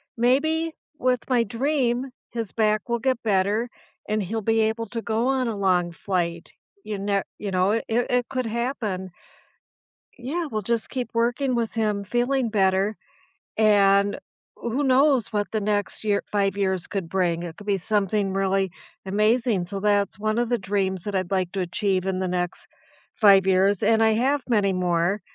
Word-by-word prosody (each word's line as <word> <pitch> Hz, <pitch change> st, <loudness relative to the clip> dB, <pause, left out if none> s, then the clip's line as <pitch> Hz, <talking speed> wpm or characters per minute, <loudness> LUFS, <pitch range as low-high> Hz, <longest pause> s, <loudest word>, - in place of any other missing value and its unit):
Maybe 315 Hz, +7 st, +2 dB, 0.3 s
with 255 Hz, -3 st, 0 dB
my 245 Hz, -2 st, +3 dB
dream, 255 Hz, +2 st, -1 dB, 0.2 s
his 230 Hz, -4 st, -4 dB
back 215 Hz, -2 st, +1 dB
will 235 Hz, 0 st, 0 dB
get 255 Hz, 0 st, 0 dB
better, 210 Hz, +3 st, +1 dB, 0.4 s
and 215 Hz, 0 st, 0 dB
he'll 220 Hz, +5 st, -3 dB
be 225 Hz, +2 st, +2 dB
able 220 Hz, +1 st, -1 dB
to 230 Hz, +2 st, -4 dB
go 225 Hz, +2 st, 0 dB
on 260 Hz, -2 st, +1 dB
a 220 Hz, -, -4 dB
long 180 Hz, -3 st, +1 dB
flight. 170 Hz, -2 st, -3 dB, 0.3 s
You 210 Hz, -1 st, -3 dB
ne 200 Hz, 0 st, 0 dB
you 205 Hz, -2 st, -4 dB
know, 185 Hz, +2 st, +2 dB
it 225 Hz, -, 0 dB
it 245 Hz, +1 st, +1 dB
could 255 Hz, -2 st, -2 dB
happen. 220 Hz, -5 st, -3 dB, 1.1 s
Yeah, 290 Hz, +8 st, -3 dB
we'll 215 Hz, -6 st, -3 dB
just 230 Hz, +2 st, -1 dB
keep 250 Hz, -2 st, -3 dB
working 240 Hz, +3 st, +1 dB
with 230 Hz, -2 st, -1 dB
him 210 Hz, -3 st, 0 dB
feeling 245 Hz, +4 st, 0 dB
better, 195 Hz, 0 st, +1 dB, 0.6 s
and 200 Hz, -2 st, +4 dB, 0.4 s
w 235 Hz, 0 st, -4 dB
who 290 Hz, -, +1 dB
knows 265 Hz, -3 st, +3 dB
what 205 Hz, -1 st, -1 dB
the 220 Hz, -, -1 dB
next 205 Hz, 0 st, -1 dB
year 205 Hz, -2 st, +1 dB
5 200 Hz, -1 st, +1 dB
years 190 Hz, -3 st, 0 dB
could 195 Hz, -5 st, -4 dB
bring, 175 Hz, -2 st, 0 dB
it 170 Hz, -1 st, -7 dB
could 205 Hz, -, -12 dB
be 200 Hz, -1 st, +2 dB
something 200 Hz, 0 st, 0 dB
really 195 Hz, -1 st, +1 dB, 0.3 s
amazing. 215 Hz, 0 st, +1 dB
So, 195 Hz, +2 st, -5 dB
that's 205 Hz, -1 st, +1 dB
one 215 Hz, +1 st, 0 dB
of 240 Hz, -1 st, 0 dB
the 240 Hz, -, +2 dB
dreams 190 Hz, -2 st, -1 dB
that 205 Hz, -1 st, -4 dB
I'd 185 Hz, -1 st, -1 dB
like 185 Hz, -2 st, 0 dB
to 195 Hz, -, -1 dB
achieve 185 Hz, +1 st, -1 dB
in 190 Hz, -1 st, -1 dB
the 185 Hz, -, -1 dB
next 180 Hz, -1 st, -3 dB, 0.5 s
5 195 Hz, -3 st, +6 dB
years. 190 Hz, +1 st, +3 dB
And 225 Hz, 0 st, +4 dB
I 220 Hz, -, +4 dB
have 265 Hz, +6 st, +1 dB
many 205 Hz, -4 st, +2 dB
more, 180 Hz, +2 st, 0 dB
210 Hz, 180 wpm, -24 LUFS, 195-235 Hz, 1.1 s, 5